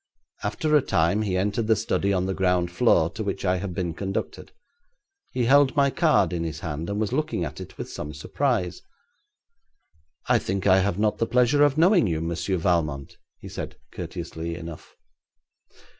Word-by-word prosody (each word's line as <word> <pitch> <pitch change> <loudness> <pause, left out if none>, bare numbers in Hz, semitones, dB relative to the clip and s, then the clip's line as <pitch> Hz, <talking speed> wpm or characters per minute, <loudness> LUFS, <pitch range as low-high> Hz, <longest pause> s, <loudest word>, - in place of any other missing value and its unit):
After 155 -2 0
a 150 - +6
time 85 -4 +1
he 95 -4 -1
entered 105 +4 0
the 110 - +4
study 100 -3 0
on 95 -1 +1
the 95 - -1
ground 90 -2 +1
floor, 85 -5 +3
to 110 +2 -5
which 100 -1 -3
I 90 0 +2
had 90 -1 -5
been 85 -2 -2
conducted. 95 +3 -4 0.8
He 125 -2 0
held 140 +2 +5
my 140 -1 +3
card 150 - +2
in 85 -1 -2
his 80 -2 -5
hand, 80 +1 -4
and 100 +1 -2
was 110 +2 -1
looking 155 - -1
at 70 - -7
it - - -10
with - - -5
some 75 - -6
surprise. 95 - -1 1.5
'I - - +4
think 95 0 -3
I 95 -1 +6
have 95 -1 0
not 105 0 +1
the 115 - +1
pleasure 125 +4 +3
of 145 0 +3
knowing 175 - +5
you, 80 -3 -1
Monsieur 85 +3 -2
Valmont,' 80 -6 -1 0.2
he - - -11
said, - - -7
courteously 85 +1 -6
enough. 85 -2 -9
95 Hz, 180 wpm, -25 LUFS, 85-120 Hz, 1.5 s, a